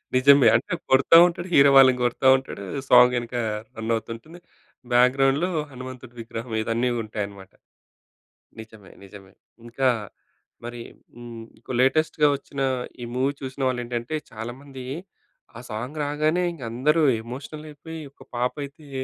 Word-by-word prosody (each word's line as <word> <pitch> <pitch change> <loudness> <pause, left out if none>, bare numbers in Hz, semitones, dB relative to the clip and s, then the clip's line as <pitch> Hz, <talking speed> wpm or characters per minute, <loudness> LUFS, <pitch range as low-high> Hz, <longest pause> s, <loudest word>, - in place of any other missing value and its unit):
నిజమే. 140 +1 +6
అంటే 115 - -1 0.2
కొడతా 140 +5 +6
ఉంటాడు 175 +1 -5
హీరో 140 0 +7
వాళ్ళని 130 -2 +6
గొడతా 120 +2 +1
ఉంటాడు, 130 -6 -8 0.3
సాంగ్ 125 0 +7
ఎనుక 120 +1 -8 0.4
రన్నావుతూ 110 0 -2
ఉంటుంది. 160 +9 -14 0.5
బ్యాక్‌గ్రౌండ్‌లో 135 +7 +3 0.2
హనుమంతుడు 130 -1 -10
విగ్రహం 115 0 -7
ఇదన్నీ 115 +3 0
ఉంటాయన్నమాట. 100 -3 -7 1.1
నిజమే, 110 -3 -13
నిజమే. 95 -1 -14 0.3
ఇంకా 130 +3 0 0.8
మరి 120 0 -7 0.3
హ్మ్, 120 -1 -9 0.2
కు - - -5
లేటెస్ట్‌గా 150 +2 +2
వచ్చిన 140 0 -7 0.4
ఈ - - -4
మూవీ 135 +2 +1
చూసిన 130 0 -6
వాళ్ళేంటంటే, 120 +2 -3 0.2
చాలా 115 +2 -6
మంది 135 -3 -10 0.7
ఆ - - -8
సాంగ్ 125 +8 -5
రాగానే 155 +4 0
ఇంక 165 - -13
అందరూ 150 +7 +2 0.2
ఎమోషనల్ 140 +6 -8
అయిపోయి 160 +2 -9
ఒక - - -16
పాపయితే 140 +4 -4
130 Hz, 125 wpm, -24 LUFS, 115-140 Hz, 1.1 s, హీరో